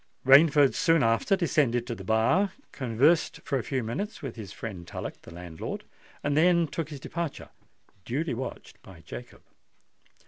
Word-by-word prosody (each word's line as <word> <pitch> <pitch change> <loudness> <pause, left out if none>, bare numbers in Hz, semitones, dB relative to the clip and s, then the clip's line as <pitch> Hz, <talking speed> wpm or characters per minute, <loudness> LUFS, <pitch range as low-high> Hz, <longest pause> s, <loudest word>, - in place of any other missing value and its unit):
Rainford 145 +1 +7
soon 165 -4 +3
after 115 - +3
descended 145 -9 +1
to 120 - -4
the 100 - -8
bar, 115 - +2 0.2
conversed 135 +6 +2
for 135 - -1
a - - -4
few 130 -3 -2
minutes 190 - -4
with 135 -4 -5
his 105 -6 -8
friend 95 -6 -7
Tullock, - - -6
the - - -13
landlord, 85 -1 -6 0.4
and 145 0 0
then 170 +2 +4
took 160 +1 -4
his 145 -3 -7
departure—duly 150 - -6
watched 130 +3 -7
by - - -14
Jacob. 60 0 -10
135 Hz, 150 wpm, -28 LUFS, 115-165 Hz, 0.4 s, Rainford